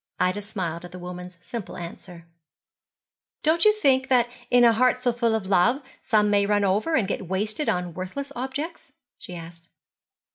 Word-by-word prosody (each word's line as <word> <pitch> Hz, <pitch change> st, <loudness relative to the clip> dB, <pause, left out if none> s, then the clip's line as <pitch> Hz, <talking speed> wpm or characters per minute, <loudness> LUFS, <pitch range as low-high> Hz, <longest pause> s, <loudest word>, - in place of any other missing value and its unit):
Ida 185 Hz, +3 st, +1 dB
smiled 185 Hz, -5 st, -4 dB
at 175 Hz, 0 st, -10 dB
the -, -, -7 dB
mother's 180 Hz, 0 st, -8 dB
simple 225 Hz, +2 st, -7 dB
answer. 170 Hz, 0 st, -9 dB, 1.2 s
'Don't 325 Hz, +4 st, +4 dB
you 425 Hz, -, +8 dB
think 270 Hz, -11 st, +2 dB
that 245 Hz, -3 st, +4 dB, 0.2 s
in 245 Hz, 0 st, +5 dB
a 235 Hz, -1 st, +7 dB
heart 250 Hz, +2 st, +3 dB
so 245 Hz, -1 st, +1 dB
full 230 Hz, -1 st, +1 dB
of 220 Hz, -3 st, -2 dB
love 200 Hz, +7 st, +3 dB, 0.2 s
some 210 Hz, -2 st, +3 dB
may 200 Hz, -1 st, +3 dB
run 205 Hz, 0 st, +2 dB
over 210 Hz, +12 st, +1 dB
and 215 Hz, -10 st, +2 dB
get 190 Hz, -2 st, -3 dB
wasted 210 Hz, -, -1 dB
on 180 Hz, -1 st, -1 dB
worthless 185 Hz, -, -5 dB
objects?' 270 Hz, +7 st, -5 dB, 0.3 s
she 180 Hz, -, -9 dB
asked. 170 Hz, 0 st, -11 dB
210 Hz, 175 wpm, -25 LUFS, 180-250 Hz, 1.2 s, you